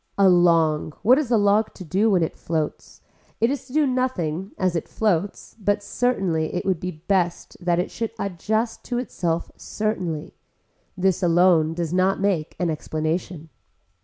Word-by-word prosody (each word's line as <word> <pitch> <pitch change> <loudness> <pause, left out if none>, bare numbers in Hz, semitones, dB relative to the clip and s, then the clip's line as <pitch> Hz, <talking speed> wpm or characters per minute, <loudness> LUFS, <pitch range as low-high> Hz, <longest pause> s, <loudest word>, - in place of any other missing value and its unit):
A 200 -1 +5
long, 165 -4 +3
what 250 +7 +6
is 290 -6 -2
a 235 - +4
log 205 +1 +2
to 185 - -9
do 195 +7 +2
when 185 -5 +3
it 160 - -3
floats, 155 -2 -4 0.4
it 230 +3 +3
is 280 -2 -4
to 255 - -13
do 305 0 +3
nothing 195 - -1
as 185 -2 0
it 165 - -2
floats 200 -3 -1
but 205 0 0
certainly 190 -12 0
it 180 - -2
would 190 -4 +1
be 180 - -3 0.2
best 180 -3 0
that 175 -1 +2
it 180 - -1
should 230 -1 -3
adjust 215 +4 -2
that - - -17
to 245 - -1
itself 170 -9 -2
certainly. 185 -8 -3 0.6
This 190 0 +1
alone 170 -2 +4
does 170 -1 -3
not 185 +1 +2
make 190 -6 0
an 175 -2 +1
explanation. 160 +1 -3
185 Hz, 170 wpm, -23 LUFS, 165-215 Hz, 0.6 s, what